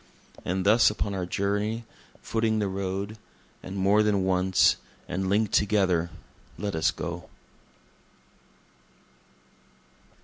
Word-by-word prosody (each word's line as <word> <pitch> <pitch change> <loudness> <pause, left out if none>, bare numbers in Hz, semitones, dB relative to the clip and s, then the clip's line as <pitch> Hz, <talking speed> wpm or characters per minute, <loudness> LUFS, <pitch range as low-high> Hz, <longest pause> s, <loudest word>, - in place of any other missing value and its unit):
And 95 +1 -1
thus 110 +4 +6
upon 105 -1 -3
our 90 -2 -3
journey, 105 +5 -1 0.4
footing 110 -1 0
the 105 -2 0
road, 100 +2 -3 0.4
and 95 - -7
more 100 +2 +4
than 105 -3 +2
once, 95 0 +3 0.3
and 95 +1 -2
link'd 105 +1 +1
together 95 -5 +2 0.5
let 100 +3 -3
us 80 0 +2
go.) - - -5
100 Hz, 105 wpm, -27 LUFS, 95-105 Hz, 0.5 s, thus